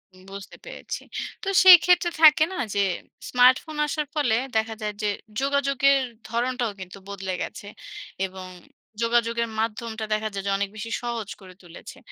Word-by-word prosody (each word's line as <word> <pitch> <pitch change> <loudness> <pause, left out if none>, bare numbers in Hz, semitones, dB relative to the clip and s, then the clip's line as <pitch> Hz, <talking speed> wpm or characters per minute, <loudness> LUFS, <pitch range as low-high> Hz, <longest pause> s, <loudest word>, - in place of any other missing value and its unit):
উম 185 - -18
বুঝতে 200 0 -10
পেরেছি। - - -7 0.4
তো - - -6 0.2
সেইক্ষেত্রে 360 -1 +7
থাকে 310 -1 +8
না? - - -6 0.2
যে - - +1 0.5
স্মার্টফোন 255 +5 +3
আসার 300 0 -2
ফলে 250 -7 +2 0.2
দেখা 220 0 -1
যায় 210 -1 -3
যে 210 - 0 0.3
যোগাযোগের 275 0 +2 0.3
ধরণটাও 240 0 -1
কিন্তু 185 0 -9
বদলে 190 -2 -5
গেছে - - -6 0.6
এবং 185 0 -9 0.5
যোগাযোগের 235 0 +1
মাধ্যমটা 225 0 -3
দেখা 215 0 -1
যায় 195 -1 -4
যে - - +1
অনেক 200 0 -2
বেশি 220 +1 -7
সহজ 235 -4 -4
করে 185 -1 -13
তুলেছে। 170 -2 -12
230 Hz, 150 wpm, -24 LUFS, 205-275 Hz, 0.6 s, থাকে